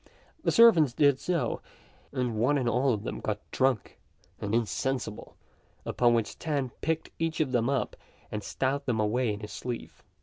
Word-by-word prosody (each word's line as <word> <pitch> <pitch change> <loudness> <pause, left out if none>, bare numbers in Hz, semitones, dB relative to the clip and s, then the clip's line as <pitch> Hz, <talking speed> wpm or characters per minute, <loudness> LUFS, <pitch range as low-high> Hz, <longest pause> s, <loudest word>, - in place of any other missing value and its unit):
The - - +2
servants 170 - +6
did 140 0 +4
so, 165 -10 -1 0.5
and 125 -3 -1
one 125 +7 +2
and 130 -3 0
all 125 +3 +2
of 105 -3 -2
them - - -4
got 105 -2 -2
drunk 130 -5 0 0.4
and 105 +2 -1
insensible; 120 0 -2 0.5
upon 120 -1 +3
which 115 -3 -2
Tan 140 -6 -1
picked 160 +1 -1
each 165 -1 -1
of 150 -5 +1
them 120 0 +2
up 140 - -1 0.4
and 105 -1 -4
stowed 140 +2 -1
them 115 -3 +1
away 110 +2 +1
in 105 0 -5
his 105 - -7
sleeve. 125 -2 -6
125 Hz, 170 wpm, -29 LUFS, 115-140 Hz, 0.5 s, servants